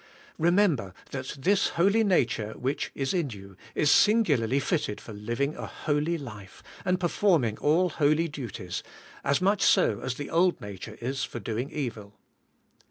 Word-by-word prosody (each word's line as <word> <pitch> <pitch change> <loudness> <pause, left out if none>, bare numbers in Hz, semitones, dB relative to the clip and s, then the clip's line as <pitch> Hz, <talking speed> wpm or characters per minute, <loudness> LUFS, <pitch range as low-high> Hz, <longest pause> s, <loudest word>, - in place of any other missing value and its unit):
Remember 165 - +2 0.2
that 130 +1 -5
this 190 +8 +2
holy 200 +6 +4
nature 115 - +1
which 135 +3 -2
is 135 -1 -1
in 170 -6 0
you 100 -3 -10 0.2
is 150 -1 +3
singularly 145 - +4
fitted 140 - -1
for 110 - -10
living 120 +8 -2
a - - -6
holy 150 +3 -1
life, 105 -9 -10 0.2
and 180 -1 +1
performing 170 - +2
all 170 +5 +3
holy 155 +3 +2
duties, 125 - -6 0.4
as 140 +5 +1
much 200 +1 +2
so 105 - +4
as 125 - -3
the 145 +2 -6
old 175 +2 +3
nature 105 +2 -8
is 130 +2 -2
for 120 - -5
doing 115 +5 -3
evil. 110 -7 -5
140 Hz, 155 wpm, -27 LUFS, 115-170 Hz, 0.4 s, holy